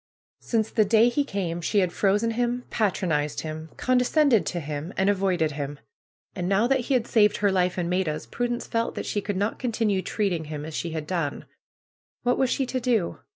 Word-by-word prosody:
Since 220 -2 -1
the 220 - +4
day 225 +3 +5
he 285 +4 +1
came 185 -9 -3
she 205 +5 -1
had 185 -3 +2
frozen 205 +3 +2
him, 245 +1 -1
patronized 170 -8 0
him, 155 0 -6
condescended 255 -1 +3
to 175 - -2
him, 150 +2 -5
and 190 +1 +3
avoided 185 -5 +1
him. 145 0 -5 0.6
And 180 -2 -2
now 200 +3 +3
that 265 +2 +2
he 255 +2 0
had 240 -2 +1
saved 210 -3 +3
her 205 -1 +2
life 180 -1 +1
and 175 -2 -1
Maida's, 175 -4 -1
Prudence 245 0 -2
felt 230 0 -1
that - - -4
she 205 - -1
could 200 -1 -3
not 205 +3 -1
continue 225 -5 0
treating 185 -6 -1
him 150 -1 -6
as 160 - -7
she 170 - -3
had 160 -2 -4
done. 165 -4 -2 0.8
What 245 0 +1
was 265 - +3
she 270 - 0
to 255 +1 -2
do? 235 -8 0
200 Hz, 200 wpm, -25 LUFS, 170-235 Hz, 0.8 s, day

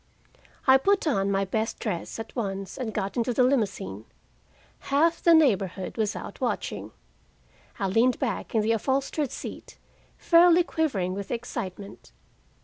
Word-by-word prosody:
I 265 0 +7
put 395 +7 +2
on 200 -10 +1
my 195 0 +1
best 220 +4 -2
dress 180 -7 -4
at 225 -1 -8
once 195 -5 -4
and 250 -5 -4
got 200 -1 -3
into 235 0 0
the 255 - +4
limousine. 200 - -1 0.8
Half 325 +4 +2
the 335 -1 +6
neighborhood 195 - +1
was 220 -2 -1
out - - -8
watching. - - -3 0.9
I 200 - -2
leaned 230 +6 +3
back 240 -4 -3
in 220 - +3
the 220 - +1
upholstered 270 +5 0
seat, - - -8 0.4
fairly 345 0 +5
quivering 225 - -1
with 200 0 -6
excitement. 205 -5 -6
225 Hz, 145 wpm, -26 LUFS, 195-275 Hz, 0.9 s, I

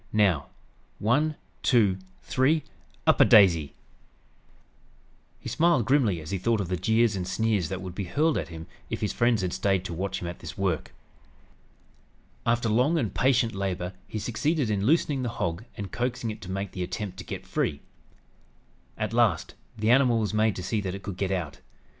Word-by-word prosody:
Now 95 -9 +2 0.5
'one 145 +8 +1 0.3
two 105 -7 +3 0.2
three 145 +4 +2 0.4
up - - +5
a - - +9
daisy!'" 85 -8 +5 1.6
He - - -9
smiled 160 -8 +3
grimly 115 - +2
as 75 +3 -8
he 95 - -1
thought 115 +3 +1
of 95 -4 -3
the 90 - 0
jeers 110 +3 +2
and 90 -2 -3
sneers 105 -5 0
that 95 0 -4
would 90 -2 -6
be 100 +1 -4
hurled 150 - +1
at - - -2
him 80 -1 -8 0.2
if - - -4
his 105 - -1
friends 120 -4 +2
had 90 - -2
stayed 95 -2 +1
to 90 - -4
watch 95 +3 -3
him 85 - -5
at 85 - -6
this - - -8
work. 95 -5 -1 1.6
After 115 0 +2
long 125 +10 +3
and 115 -10 -1
patient 125 -3 +2
labor 95 -2 -3
he - - -5
succeeded 125 +4 0
in 100 0 0
loosening 150 -2 +2
the 125 - -1
hog 85 +6 -2
and 100 -2 -5
coaxing 120 -2 -2
it 110 0 -9
to 95 - -9
make 95 +1 -3
the 90 - -6
attempt 95 +2 -4
to - - -6
get - - -7
free. 70 - -1 1.2
At 110 0 -2
last, 115 -8 +2 0.2
the 110 +2 +2
animal 125 -2 +5
was 110 -2 -1
made 110 -1 +2
to 90 - -5
see 105 +3 -1
that 95 -1 -3
it 100 - -9
could 95 -2 -6
get 95 -1 -1
out. 90 -7 -3
105 Hz, 190 wpm, -27 LUFS, 95-120 Hz, 1.6 s, a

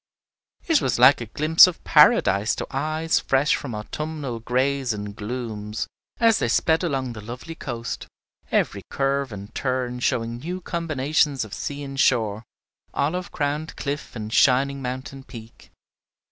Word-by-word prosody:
It 325 -4 +3
was 125 - 0
like 125 +2 +6
a 120 - -5
glimpse 155 - +6
of 180 - -5
Paradise 105 -9 +4
to - - -4
eyes 155 +4 0
fresh 135 +2 +2
from 125 -6 -5
autumnal 140 +2 -5
grays 130 +1 0
and 105 -1 -6
glooms, 110 -1 -4 0.3
as 230 -2 +4
they - - +1
sped 160 +8 +2
along 135 -7 -1
the 105 - -8
lovely 125 +9 -8
coast, 120 -7 -5 0.4
every 100 - +1
curve 135 -1 0
and 100 +2 -9
turn 125 -2 -2
showing 115 -1 -1
new 175 +7 -5
combinations 155 -6 0
of 105 - -11
sea 145 0 -5
and 135 -1 -6
shore, 110 -6 +2 0.5
olive 175 +6 -1
crowned 150 +2 -2
cliff 140 -1 -5
and 110 -1 -5
shining 140 +1 +3
mountain 130 +1 -5
peak. 115 -3 -13
130 Hz, 145 wpm, -24 LUFS, 115-150 Hz, 0.5 s, like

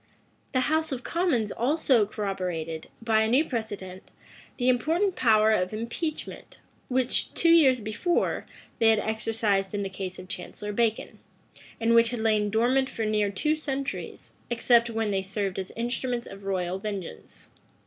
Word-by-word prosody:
The 255 - +3
house 315 +3 +1
of 255 -2 -4
commons 295 - 0
also 255 -4 +2
corroborated, 180 -6 -4
by 220 -1 +3
a 220 - +2
new 260 +8 +3
precedent, 205 -6 -5 0.6
the 245 - 0
important 325 +10 +2
power 220 -3 +4
of 185 -2 +1
impeachment, 235 +8 -5 0.3
which, 255 0 0
two 335 - +4
years 275 -7 +6
before, 220 - -1 0.3
they 225 - +4
had 220 0 +6
exercised 215 -2 0
in 205 - -1
the 195 - -3
case 185 -1 -6
of 185 - -10
Chancellor 195 +3 -6
Bacon, 225 0 -1 0.6
and 230 0 +2
which 230 0 +6
had 240 -1 -4
lain 215 -2 +2
dormant 250 +5 +2
for 225 - -3
near 210 -1 +1
two 300 +11 0
centuries, 275 -3 -5 0.2
except 235 0 +3
when 225 -2 -1
they 195 -1 0
served 195 0 -3
as 190 - -5
instruments 240 +1 -2
of 195 0 -11
royal 185 -1 -1
vengeance. 195 - -7
225 Hz, 155 wpm, -27 LUFS, 200-255 Hz, 0.6 s, years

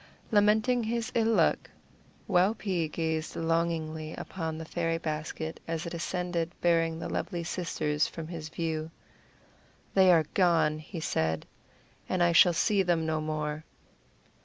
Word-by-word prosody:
Lamenting 220 +4 +3
his 230 0 -2
ill 225 -1 +2
luck, - - +2 0.6
Waupee 185 -2 +1
gazed 160 0 -2
longingly 165 -1 -1
upon 160 -4 -5
the 160 - -6
fairy 165 0 -1
basket 160 0 -4
as 165 0 -3
it 170 - -5
ascended 175 0 -3
bearing 165 -1 +2
the 165 - -5
lovely 175 -3 -3
sisters 155 -4 -1
from 165 -1 -7
his 160 -2 -6
view. 160 -1 -3 1.0
"They 190 -1 +6
are 165 -3 +5
gone," 165 -5 +3
he 160 +2 -7
said, 80 - -1 0.6
"and 185 -1 +2
I 175 - +4
shall 175 +1 +7
see 200 +4 +2
them 170 -3 +1
no 155 -1 0
more." 155 0 -3
165 Hz, 135 wpm, -29 LUFS, 160-180 Hz, 1.0 s, shall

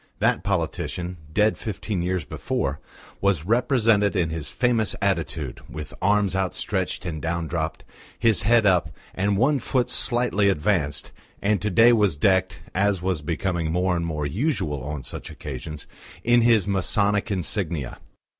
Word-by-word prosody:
That 75 - +1
politician, 90 -1 -2
dead 105 +6 +2
fifteen 105 -2 -3
years 90 -2 -1
before, 70 0 -2 0.4
was 100 -6 +1
represented 115 -2 +3
in 85 -4 +1
his 80 -2 -4
famous 120 -4 +1
attitude, 85 - -2
with 75 -1 -7
arms 100 -1 +2
outstretched 95 0 -2
and 80 -3 -4
down 85 0 -2
dropped, 80 0 -3 0.3
his 115 -3 +3
head 115 +2 +4
up 90 -3 +3 0.2
and 100 +1 0
one 135 +6 +3
foot 125 +1 0
slightly 120 -5 +2
advanced, 80 -4 0 0.3
and 100 0 +1
to 105 - 0
day 115 +6 +6
was 105 -9 +2
decked, 95 +3 +2
as 95 -1 +1
was 90 -5 -1
becoming 85 +1 -2
more 90 +1 +1
and 85 -1 -2
more 75 -2 -2
usual 75 - -1
on 70 0 -5
such - - -7
occasions, 75 +2 -7 0.4
in 120 0 +4
his 115 -4 +4
Masonic 100 +2 +1
insignia. 85 - -2
95 Hz, 145 wpm, -24 LUFS, 80-105 Hz, 0.4 s, day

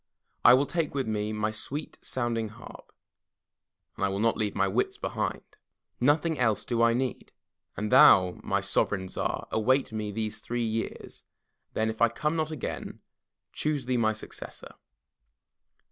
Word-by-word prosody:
I 120 - +9
will 135 +2 +2
take 160 -2 -2
with 135 -2 0
me 105 -1 -1
my 110 0 -1
sweet 135 +8 -5
sounding 115 -3 -2
harp, 110 +3 -13 1.0
and - - -4
I - - +4
will 95 - -2
not 115 +2 +2
leave 105 -2 -2
my 100 - +2
wits 110 +6 0
behind. - - -3 0.6
Nothing 150 +3 +2
else 110 -4 +1
do 120 -1 0
I 115 0 +5
need. 130 0 -3 0.5
And 105 0 -2
thoUj 100 -10 +6
my 100 0 0
Sovereign 100 -1 0
Tsar, - - -3
await 130 +5 +2
me 105 -1 -3
these 110 0 -3
three 120 0 -3
years, 115 0 -4 0.5
then 110 - +1
if 110 0 -4
I 115 - +6
come 150 +7 -1
not 155 -1 0
again, 155 -5 -5 0.5
choose 150 -4 -1
thee 125 0 0
my 110 -2 +2
successor." 110 - -9
115 Hz, 160 wpm, -28 LUFS, 105-130 Hz, 1.0 s, I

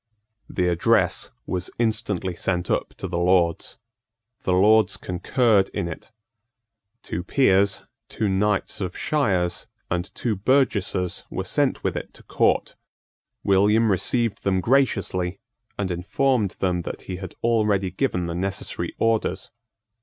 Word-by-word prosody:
The 90 - 0
address 85 -1 +2 0.2
was 90 0 -2
instantly 100 -5 -1
sent 90 +1 -1
up - - -1
to - - -5
the 85 - -2
Lords. 85 -1 +1 0.6
The - - -1
Lords 105 +2 +4
concurred 100 +3 +1
in 100 -4 -1
it. 85 - -8 0.9
Two 85 - -4
peers, 100 -3 +3 0.3
two 110 - -1
knights 100 +1 0
of 90 -2 -4
shires, 95 - 0 0.2
and 90 +3 -2
two 115 -3 -1
burgesses 100 -6 +1
were - - -3
sent - - 0
with - - -1
it - - -6
to - - -15
Court. - - +1 0.7
William 105 +3 +4
received 115 +4 +1
them 95 -1 +1
graciously, 95 -6 +1 0.4
and 95 -2 -2
informed 105 +5 0
them 90 -2 0
that - - -7
he 90 - -5
had 95 -1 -8
already 105 -5 +2
given 90 -4 -1
the 85 - -3
necessary 95 +2 -3
orders. 110 -5 0
95 Hz, 130 wpm, -24 LUFS, 90-110 Hz, 0.9 s, Lords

